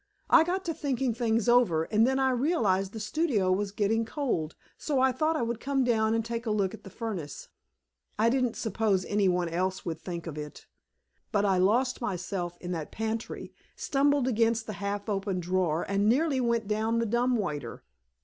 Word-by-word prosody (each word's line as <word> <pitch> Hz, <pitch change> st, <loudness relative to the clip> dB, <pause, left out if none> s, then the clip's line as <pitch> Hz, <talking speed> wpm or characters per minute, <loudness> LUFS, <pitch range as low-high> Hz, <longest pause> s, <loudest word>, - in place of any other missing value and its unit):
I -, -, +8 dB
got 370 Hz, +3 st, -2 dB
to 330 Hz, -, -1 dB
thinking 265 Hz, -5 st, -1 dB
things 230 Hz, -1 st, 0 dB
over, 240 Hz, -10 st, +4 dB
and 220 Hz, +6 st, +2 dB
then 265 Hz, 0 st, +1 dB
I 265 Hz, -1 st, +2 dB
realized 230 Hz, -, +1 dB
the 220 Hz, -, -7 dB
studio 215 Hz, -, 0 dB
was 195 Hz, +1 st, 0 dB
getting 215 Hz, +2 st, +1 dB
cold, 225 Hz, -, -2 dB, 0.2 s
so 285 Hz, -4 st, -1 dB
I 260 Hz, 0 st, +4 dB
thought 315 Hz, +4 st, 0 dB
I 250 Hz, -, 0 dB
would 235 Hz, 0 st, -2 dB
come 270 Hz, 0 st, 0 dB
down 225 Hz, -2 st, +2 dB
and 225 Hz, -1 st, -1 dB
take 230 Hz, 0 st, -4 dB
a -, -, +1 dB
look 200 Hz, -3 st, 0 dB
at -, -, -10 dB
the -, -, -10 dB
furnace. 190 Hz, -8 st, -6 dB, 0.7 s
I 220 Hz, +2 st, +3 dB
didn't 250 Hz, -3 st, +1 dB
suppose 210 Hz, -3 st, 0 dB
any 205 Hz, -2 st, +2 dB
one 180 Hz, -1 st, +1 dB
else 185 Hz, +3 st, -2 dB
would 160 Hz, -2 st, -3 dB
think 170 Hz, -1 st, -6 dB
of 155 Hz, -3 st, -6 dB
it. 150 Hz, 0 st, -8 dB, 0.7 s
But 205 Hz, -2 st, +2 dB
I 190 Hz, -2 st, +3 dB
lost 245 Hz, +8 st, +2 dB
myself 180 Hz, -4 st, -3 dB
in 180 Hz, -, -6 dB
that 160 Hz, -4 st, -4 dB
pantry, 220 Hz, +1 st, -4 dB, 0.2 s
stumbled 285 Hz, -1 st, +1 dB
against 230 Hz, -1 st, +1 dB
a -, -, -3 dB
half 200 Hz, +1 st, -4 dB
open 195 Hz, -2 st, -1 dB
drawer, 175 Hz, -2 st, 0 dB
and 200 Hz, +2 st, +2 dB
nearly 275 Hz, +2 st, +2 dB
went 235 Hz, -3 st, 0 dB
down 220 Hz, +2 st, 0 dB
the 230 Hz, -, +1 dB
dumb 240 Hz, +3 st, +1 dB
waiter." 150 Hz, -, -4 dB
220 Hz, 195 wpm, -28 LUFS, 190-245 Hz, 0.7 s, I